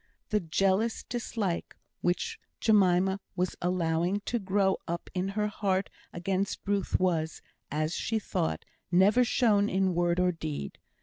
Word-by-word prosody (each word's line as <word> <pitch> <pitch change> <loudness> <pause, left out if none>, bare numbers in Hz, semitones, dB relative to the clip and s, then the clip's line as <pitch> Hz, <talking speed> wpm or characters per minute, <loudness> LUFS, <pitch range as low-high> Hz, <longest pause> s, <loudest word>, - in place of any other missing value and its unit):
The 210 - +2
jealous 195 +6 +1
dislike 220 -6 -3 0.3
which 175 0 -1 0.2
Jemima 190 -2 +4 0.2
was 180 0 -1
allowing 175 +2 +1
to 240 +3 -2
grow 195 -1 +2
up 170 +1 -4
in 185 +1 -1
her 210 +2 -1
heart 200 -2 -1 0.2
against 190 +3 -2
Ruth 200 -1 0
was, 165 -4 0 0.3
as 155 +2 -1
she 225 - -1
thought, 80 - -2 0.3
never 200 +7 +5
shown 215 -4 +3
in 190 -1 +1
word 175 0 +1
or 180 0 +3
deed. 155 - -5
190 Hz, 135 wpm, -29 LUFS, 175-205 Hz, 0.3 s, never